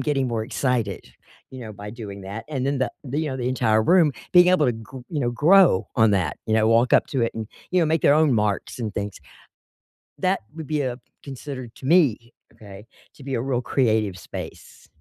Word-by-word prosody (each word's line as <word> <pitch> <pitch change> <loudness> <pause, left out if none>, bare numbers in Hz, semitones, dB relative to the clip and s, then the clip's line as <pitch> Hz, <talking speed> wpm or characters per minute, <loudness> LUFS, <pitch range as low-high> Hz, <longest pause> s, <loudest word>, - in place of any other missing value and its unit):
getting 135 -2 0
more 115 -2 -2
excited, 115 -5 -2 0.4
you 130 - -9
know, 110 -3 -8
by 105 0 -9
doing 105 -3 -8
that, 100 +4 -7
and 135 -4 -2
then 140 +1 0
the 130 - 0
the, 140 +3 -2
you 160 - -2
know, 130 - -4
the 125 0 -1
entire 110 -4 +2
room 165 +2 +4 0.2
being 180 0 +7
able 180 -5 +4
to 125 - +2
gr 115 +4 -10
you 150 - -3
know, 120 -3 0
grow 165 - +4
on 110 -1 +5
that, 95 -4 0
you 110 - -1
know, 110 0 +3
walk 115 +2 +3
up - - +5
to 130 -4 -1
it 115 - 0
and, 110 -1 -5 0.2
you 180 - +2
know, 165 - +2
make 160 0 0
their - - +5
own 155 -4 +3
marks 105 0 -1
and 110 -4 -4
things. 100 -1 -4 1.0
That - - +1 0.2
would 160 -3 -7
be, 150 -2 -1
uh, 125 -2 -3 0.3
considered 130 -3 -8
to - - -11
me, 135 -8 +3 0.2
okay, 100 -1 -13 0.3
to 140 - -14
be 135 0 -5
a 115 - -1
real 130 -1 -1
creative 110 -7 0
space. - - -10
125 Hz, 220 wpm, -23 LUFS, 110-145 Hz, 1.0 s, being